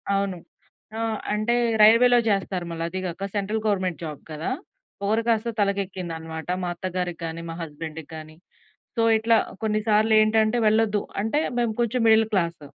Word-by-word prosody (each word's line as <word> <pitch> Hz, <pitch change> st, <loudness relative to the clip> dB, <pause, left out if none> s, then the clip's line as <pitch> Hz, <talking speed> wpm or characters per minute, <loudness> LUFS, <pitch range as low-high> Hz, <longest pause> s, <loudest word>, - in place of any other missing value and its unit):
అవును. 195 Hz, -2 st, -1 dB, 0.6 s
ఆహ్, 225 Hz, -1 st, -1 dB, 0.2 s
అంటే 215 Hz, +3 st, +1 dB, 0.3 s
రైల్వేలో 240 Hz, +3 st, +7 dB
జేస్తారు. 195 Hz, -3 st, 0 dB
మళ్ళీ 165 Hz, 0 st, -4 dB
అదీ 185 Hz, +2 st, -4 dB
గాక 180 Hz, +2 st, -4 dB
సెంట్రల్ 210 Hz, +2 st, -1 dB
గవర్నమెంట్ 185 Hz, -6 st, 0 dB
జాబ్ 150 Hz, -3 st, -6 dB
కదా! 155 Hz, +8 st, -3 dB, 0.5 s
పొగరు 215 Hz, +3 st, +1 dB
కాస్త 230 Hz, 0 st, +1 dB
తలకెక్కింది 195 Hz, -3 st, -1 dB
అనమాట 160 Hz, +1 st, -8 dB
మా 175 Hz, -, -1 dB
అత్తగారికి 180 Hz, -1 st, -3 dB
కానీ, 165 Hz, +1 st, -5 dB
మా 165 Hz, -, -5 dB
హస్బెం‌డ్‌కి 160 Hz, 0 st, -7 dB
గానీ. 155 Hz, 0 st, -10 dB, 0.6 s
సో, 230 Hz, -, +2 dB, 0.2 s
ఇట్లా 225 Hz, +1 st, +3 dB, 0.2 s
కొన్ని 215 Hz, -1 st, +1 dB
సార్లు 215 Hz, +1 st, +3 dB
ఏంటంటే, 215 Hz, +1 st, +3 dB
వెళ్ళొద్దు. 215 Hz, -1 st, +3 dB, 0.2 s
అంటే, 225 Hz, +8 st, 0 dB, 0.2 s
మేము 235 Hz, -2 st, +1 dB
కొంచెం 240 Hz, +1 st, 0 dB
మిడిల్ 220 Hz, 0 st, +5 dB
క్లాస్... 170 Hz, -4 st, 0 dB
200 Hz, 155 wpm, -24 LUFS, 170-220 Hz, 0.6 s, రైల్వేలో